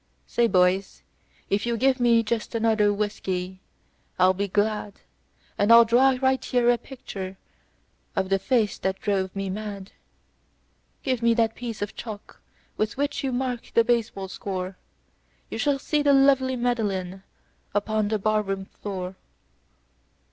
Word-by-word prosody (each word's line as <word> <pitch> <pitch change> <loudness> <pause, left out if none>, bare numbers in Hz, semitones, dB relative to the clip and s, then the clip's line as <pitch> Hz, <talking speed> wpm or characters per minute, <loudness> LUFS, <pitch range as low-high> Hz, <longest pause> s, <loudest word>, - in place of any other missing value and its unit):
"Say, 235 -1 +2
boys, 185 0 +1 0.5
if 200 +1 +1
you 235 -1 0
give 260 +2 +2
me 235 -2 +4
just 225 +1 -3
another 220 -2 +3
whiskey 190 -3 -3 0.6
I'll 185 0 +5
be 200 +2 -2
glad, 210 +1 0 0.7
And 205 +3 +3
I'll 230 0 +9
draw 255 +3 +4
right 265 0 +2
here 245 -1 +3
a 240 - +1
picture 195 -7 -8 0.8
of 190 - 0
the 195 0 +2
face 220 0 +1
that 190 0 -2
drove 195 -3 -1
me 195 0 -3
mad. 200 -1 -6 1.1
Give 255 -3 -1
me 235 0 +3
that 225 -1 +2
piece 230 -4 -5
of 205 - -5
chalk 215 -3 -9 0.4
with 215 +2 -1
which 285 0 -1
you 270 - -1
mark 250 -1 -3
the 230 - +6
baseball 225 -5 0
score 185 0 -5 0.8
You - - -4
shall 285 -2 +2
see 295 +2 0
the 285 -1 +4
lovely 270 -1 +4
Madeline 205 -7 -1 0.5
upon 215 +1 +1
the 215 +1 0
barroon 200 -2 -1
floor." 190 -2 -6
215 Hz, 145 wpm, -25 LUFS, 195-240 Hz, 1.1 s, I'll